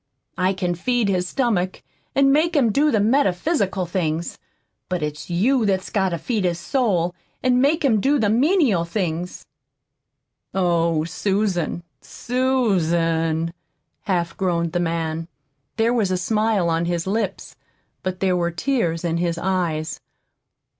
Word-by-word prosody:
I 185 +1 +2
can 180 -2 -1
feed 235 +4 0
his 180 -2 0
stomach 195 -7 -1 0.3
an' 275 0 +5
make 320 +4 +2
him 250 -7 +4
do 295 +7 +3
the 220 - +2
metaphysical 205 - +1
things, 170 -2 -2 0.5
but 180 -3 -1
it's 150 +2 -5
you 230 +9 +2
that's 190 -3 0
got 190 -2 +1
to 170 - -2
feed 215 +4 -2
his 175 -2 0
soul 180 - 0 0.3
an' 250 -1 +3
make 295 +3 +2
him 220 -6 +3
do 285 +5 +3
the 220 -5 +1
menial 250 - +3
things." 175 -1 -3 1.1
"Oh, 170 -3 +2
Susan, 180 0 -1 0.2
Susan!" 170 -10 0 0.5
half 175 -4 -1
groaned 170 -3 0
the 175 - +1
man. 165 -1 -2 0.5
There 230 +1 +2
was 220 -6 +1
a 185 - 0
smile 210 0 +1
on 165 0 +1
his 170 -1 -1
lips, 200 0 -3 0.5
but 185 -1 -4
there 185 -2 +2
were 170 -1 +1
tears 170 -3 -1
in 170 0 0
his 170 -1 -1
eyes. 170 -4 -1
185 Hz, 140 wpm, -22 LUFS, 170-230 Hz, 1.1 s, an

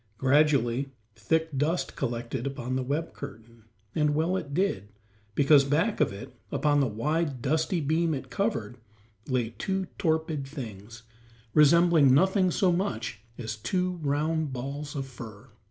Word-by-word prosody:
Gradually 135 -1 +3 0.3
thick 160 +7 0
dust 150 +6 0
collected 120 0 -3
upon 130 -2 -3
the 130 - 0
web 145 +6 -2
curtain, 115 -4 -10 0.3
and 150 -1 +2
well 165 +4 +1
it 145 -6 -4
did, 140 - 0 0.5
because 140 0 +6
back 160 +11 +1
of - - +3
it, 120 +7 -9 0.2
upon 145 -1 +2
the 135 - +3
wide, 145 +5 -1
dusty 160 - 0
beam 160 +2 +1
it 130 -2 -7
covered, 125 - -2 0.5
lay 125 -4 0
two 190 -1 -1
torpid 160 -3 0
things, 115 -5 -8 0.5
resembling 155 -2 +6
nothing 190 +3 +3
so 180 +1 +2
much 120 - -2 0.2
as 110 -3 -4
two 180 - -1
round 155 +1 0
balls 140 +4 -5
of 140 - -2
brown 115 -1 -7
fur. 135 - -21
145 Hz, 145 wpm, -28 LUFS, 125-160 Hz, 0.5 s, because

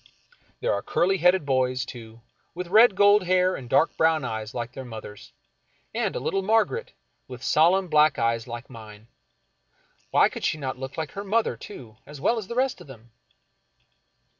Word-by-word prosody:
There - - +1
are - - -2
curly 190 +2 0
headed 180 -1 +3
boys, 130 -1 0
too, 115 -3 -11 0.3
with 180 0 -6
red 215 +1 +6
gold 205 -1 +5
hair 185 +1 +2
and 125 -3 -9
dark 160 - +2
brown 160 -3 +2
eyes 110 -2 -5
like 120 0 -4
their 135 +1 -8
mother's, 110 -4 -10 0.6
and - - -1
a - - -1
little 195 - -1
Margaret, 225 - 0 0.3
with 125 -1 -10
solemn 180 +5 +3
black 155 -2 +4
eyes 115 0 0
like 120 +1 -7
mine. 110 -2 -13 1.0
Why - - +4
could - - -8 0.2
not 130 -3 -4
she - - -19
look 135 +3 -7
like 160 -2 -4
her 200 - -6
mother, 220 +3 0
too, 115 - -12
as 150 -1 -10
well 230 - +1
as 205 - -8
the 235 - -6
rest 260 +1 0
of - - -13
them? 120 -3 -14
150 Hz, 180 wpm, -25 LUFS, 120-190 Hz, 1.0 s, red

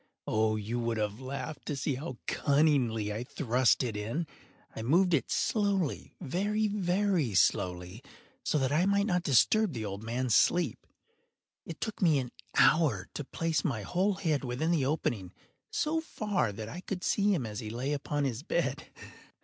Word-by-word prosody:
Oh, 110 0 +1
you 110 +3 -3
would 115 -1 -1
have 105 0 -2
laughed 140 +3 -6
to 145 - -1
see 135 +1 -1
how 130 -1 -5
cunningly 130 -8 +2
I 110 +3 -3
thrust 125 -1 +2
it 115 -4 -3
in! 115 +11 -2 0.5
I - - -5
moved 175 +10 +3
it 135 -7 +1
slowly—very, 200 - 0
very 185 - +1
slowly, 90 +4 +1 0.4
so - - +1
that 135 -2 +1
I 170 +6 +3
might 200 0 +3
not 180 -4 +1
disturb 180 - +3
the 110 -3 -4
old 100 0 -5
man’s 120 +2 -1
sleep. 175 - +2 0.8
It 165 - -7
took 220 -1 -4
me 165 -5 +4
an 125 -2 -3 0.2
hour 135 - +4
to 145 - -4
place 160 +1 -1
my 115 -8 -1
whole 190 - +1
head 160 -7 0
within 130 +6 -1
the 150 -6 +2
opening 110 - -2 0.4
so 325 -7 0
far 210 - -1
that 105 +2 -7
I 175 +10 -7
could 185 -1 -5
see 205 0 +2
him 160 -11 0
as 105 0 -5
he 110 -3 -5
lay 125 +6 -2
upon 145 0 -2
his 130 -3 -2
bed. 160 - -1
140 Hz, 170 wpm, -30 LUFS, 115-180 Hz, 0.8 s, me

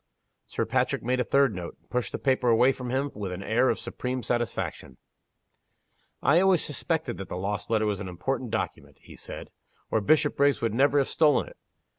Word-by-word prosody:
Sir - - -2
Patrick - - 0
made 125 +2 0
a - - +3
third 140 -1 +3
note, 90 -2 -7
and - - -36
pushed 125 -5 -1
the - - -3
paper 130 -3 +1
away 120 +3 +5
from 125 -2 -6
him 135 +3 -1
with 100 -3 -5
an 90 +2 -5
air 120 +5 +2
of - - +1
supreme 125 0 -4
satisfaction. 115 - -3 1.3
"I 160 +5 +5
always 190 -3 +3
suspected 150 -2 -2
that 95 - -7
lost 100 +3 -3
letter 110 -1 +2
to 105 -1 +1
be 100 - -9
an 95 - -5
important 120 +8 -3
document," 110 0 -4
he - - -14
said - - -9 0.4
"or 110 - +2
Bishopriggs 145 +3 +3
would 115 -2 -1
never 140 +4 +3
have 140 - +3
stolen 155 -2 +3
it. - - -17
125 Hz, 195 wpm, -27 LUFS, 105-140 Hz, 1.3 s, away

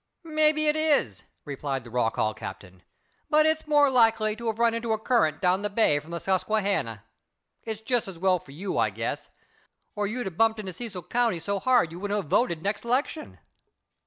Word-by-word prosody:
"Maybe 310 -1 +2
it 300 - +3
is," 295 - +1 0.2
replied 140 -2 -4
the 120 - -12
Rock 120 -2 0
Hall 110 0 0
captain, 90 -3 -9 0.5
"but 305 0 +4
it's 315 0 +1
more 295 -1 +5
likely 225 -3 +3
to 235 +1 -6
have 220 -1 -1
run 235 0 +3
into 230 -1 -1
a - - 0
current 215 - +1
down 185 +1 +2
the 205 - -2
bay 200 -8 +2
from 150 +3 -15
the 170 - -4
Susquehanna. 190 - -1 0.6
It's 220 -1 -6
just 245 -2 0
as 190 -3 -8
well 185 +1 +2
for 145 - -21
you, 185 +7 -3
I - - +3
guess, - - -4 0.7
or 205 -1 -1
you'd 245 +3 -3
a 190 - -3
bumped 220 +5 +2
into 190 -3 -6
Cecil 195 -3 -7
county 230 -2 0
so 200 +4 -2
hard 245 -8 +3
you 170 - -8
wouldn't 205 +1 -1
a 185 - -6
voted 170 - +1
next 200 +1 -2
'lection." 265 +6 -2
210 Hz, 200 wpm, -26 LUFS, 170-240 Hz, 0.7 s, more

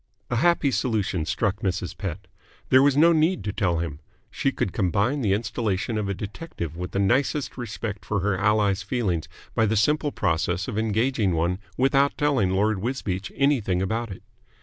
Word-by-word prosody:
A 120 - +1
happy 165 0 +3
solution 105 - -1
struck 105 -3 0
Mrs. 95 -2 -2
Pett. 95 -6 -5 0.4
There 130 - +7
was 140 0 +4
no 170 +3 +6
need 165 +4 +2
to 105 - -3
tell 90 -6 +1
him. 80 -3 -4 0.3
She 135 - 0
could 100 - -2
combine 100 - +1
the 100 -5 +2
installation 105 -1 -1
of 105 -2 -1
a 100 - -1
detective 100 - -6
with 90 +1 -5
the - - -4
nicest 130 +7 +1
respect 115 -3 -5
for 100 -3 -1
her 100 0 +1
ally's 100 0 +2
feelings 95 -6 -1 0.3
by 110 - +2
the 110 +1 +1
simple 150 +7 +2
process 85 0 0
of 125 - -4
engaging 110 -3 +1
one 85 +3 0 0.2
without 135 +2 +3
telling 140 -10 +2
Lord 100 +2 +1
Wisbeach 100 -4 -3
anything 125 -10 +2
about 110 +5 -1
it. 95 - -9
105 Hz, 175 wpm, -25 LUFS, 95-130 Hz, 0.4 s, There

